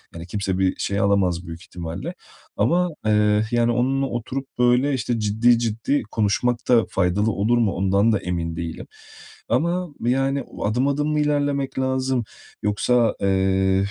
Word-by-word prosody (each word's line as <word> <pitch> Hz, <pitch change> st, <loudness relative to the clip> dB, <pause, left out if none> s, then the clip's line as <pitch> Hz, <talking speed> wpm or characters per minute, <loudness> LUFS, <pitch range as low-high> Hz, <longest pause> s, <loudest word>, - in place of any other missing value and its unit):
yani, 85 Hz, +1 st, -8 dB
kimse 95 Hz, 0 st, -2 dB
bir 95 Hz, -1 st, +1 dB
şey 100 Hz, 0 st, -2 dB
alamaz 95 Hz, -3 st, +1 dB
büyük 85 Hz, 0 st, -8 dB
ihtimalle. 90 Hz, -, -6 dB, 0.4 s
Ama, 180 Hz, +1 st, +2 dB, 0.2 s
eee, 105 Hz, 0 st, +3 dB
yani, 120 Hz, 0 st, +2 dB
onunla 130 Hz, +3 st, +1 dB
oturup, 130 Hz, +2 st, -4 dB
böyle, 125 Hz, +3 st, +3 dB
işte 120 Hz, -2 st, -1 dB
ciddi 110 Hz, +3 st, +3 dB
ciddi 115 Hz, +5 st, -1 dB
konuşmak 110 Hz, +3 st, +1 dB
da 120 Hz, -3 st, +5 dB
faydalı 95 Hz, +4 st, +1 dB
olur 110 Hz, +4 st, +1 dB
mu? 115 Hz, -4 st, +2 dB
O 95 Hz, -, -4 dB
ndan 100 Hz, +4 st, +3 dB
da 105 Hz, -, +1 dB
emin 85 Hz, -2 st, -3 dB
değilim. 85 Hz, -1 st, -6 dB, 0.6 s
Ama 175 Hz, +2 st, 0 dB
yani, 135 Hz, +3 st, +1 dB
o -, -, -7 dB
adım 120 Hz, +6 st, +1 dB
adım 145 Hz, +1 st, 0 dB
mı 150 Hz, -, +1 dB
ilerlemek 145 Hz, -2 st, 0 dB
lazım, 130 Hz, -1 st, 0 dB, 0.4 s
yoksa, 115 Hz, +3 st, +2 dB
eee, 95 Hz, 0 st, +2 dB
115 Hz, 155 wpm, -22 LUFS, 95-130 Hz, 0.6 s, da